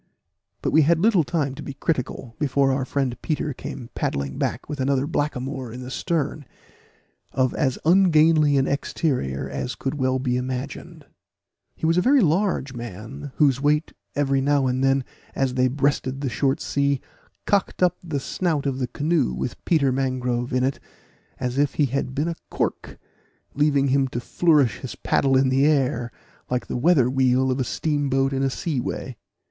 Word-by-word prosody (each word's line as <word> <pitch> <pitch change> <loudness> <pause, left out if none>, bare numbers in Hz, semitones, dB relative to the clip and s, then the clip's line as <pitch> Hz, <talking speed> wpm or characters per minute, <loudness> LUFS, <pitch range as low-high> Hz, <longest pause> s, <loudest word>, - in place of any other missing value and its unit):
But - - 0
we 160 - +5
had 160 +3 +4
little 195 -1 +4
time 145 -3 -1
to 145 - -9
be 140 - -7
critical, 130 -5 -3
before 140 -2 +2
our 130 0 0
friend 135 -3 -1
Peter 150 -2 -2
came 120 -1 -8
paddling 70 -1 -2
back - - -2
with 150 -1 -5
another 135 0 +1
blackamoor 135 -4 -3
in 125 +2 -7
the 125 - -7
stern, 155 0 -2 0.9
of 130 -1 +1
as 135 -4 0
ungainly 160 -4 +5
an 135 - +3
exterior 130 - -1
as 70 - -4
could 135 - -3
well 130 0 +1
be 125 -1 0
imagined. 130 +2 -5 0.7
He - - -4
was 165 +2 +3
a - - +3
very 270 +5 +4
large 170 -5 +1
man, 120 +5 -7
whose 140 -3 +3
weight 150 +2 +1 0.2
every 135 -2 +1
now 140 0 +2
and 130 +1 0
then, 135 0 +3 0.3
as 135 -2 0
they 130 0 +3
breasted 135 0 0
the 135 - -1
short 135 +4 0
sea, 140 -1 0 0.5
cocked 200 -2 +1
up 180 -1 +3
the 160 -5 -2
snout 155 0 -1
of 135 -1 -1
the 125 - -1
canoe 150 - 0
with 65 +1 -5
Peter 145 -6 +3
Mangrove 125 -2 -1
in 125 -1 +1
it, 135 +1 0 0.6
as 125 +2 -2
if 145 0 +1
he 150 - +3
had 135 0 -2
been 150 +3 0
a 170 - -2
cork, - - -3 0.6
leaving 140 -2 +2
him 135 0 +3
to 120 - -4
flourish 150 -1 +2
his 130 - -7
paddle 135 -1 +2
in 130 0 +3
the 135 +1 +3
air, 135 -5 +1 0.4
like 125 0 -1
the - - -5
weather 135 -1 +4
wheel 130 0 +2
of 130 - -1
a - - +2
steam 145 +1 -1
boat 135 +1 +1
in 135 - 0
a 135 - +2
sea 145 +1 -2
way. 125 +1 -4
135 Hz, 180 wpm, -23 LUFS, 130-150 Hz, 0.9 s, we